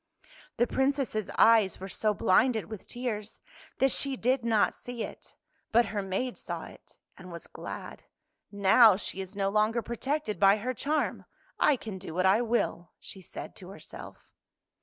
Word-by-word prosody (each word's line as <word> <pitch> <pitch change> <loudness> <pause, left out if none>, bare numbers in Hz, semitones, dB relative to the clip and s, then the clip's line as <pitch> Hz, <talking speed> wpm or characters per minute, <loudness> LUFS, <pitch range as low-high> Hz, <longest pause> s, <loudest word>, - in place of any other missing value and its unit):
The 240 - +4
Princess' 265 -6 -1
eyes 220 -4 +5
were 190 - -6
so 215 +2 0
blinded 220 +3 +2
with 215 -3 -8
tears 225 -4 -5 0.4
that 270 0 +3
she 275 +1 -1
did 250 +1 +1
not 225 -3 +2
see 245 -2 -6
it, - - -10 0.4
but 235 +2 +5
her 205 - -1
maid 195 +6 -3
saw - - -5
it, - - -15 0.2
and 180 -1 -11
was 170 -1 -8
glad. - - -8 0.3
" - - -54
Now 205 +2 +6
she 195 0 -5
is 190 +1 -8
no 195 -1 0
longer 215 +3 +1
protected 260 -1 -3
by 195 +1 +6
her 250 +5 -3
charm, 295 +5 -1 0.3
I 300 - +5
can 215 -6 -7
do 175 -3 -8
what 185 +1 +1
I 195 +5 +5
will," 225 -8 -1
she 190 - -10
said - - -9
to 180 - -11
herself. 195 - -12
220 Hz, 170 wpm, -29 LUFS, 195-245 Hz, 0.4 s, Now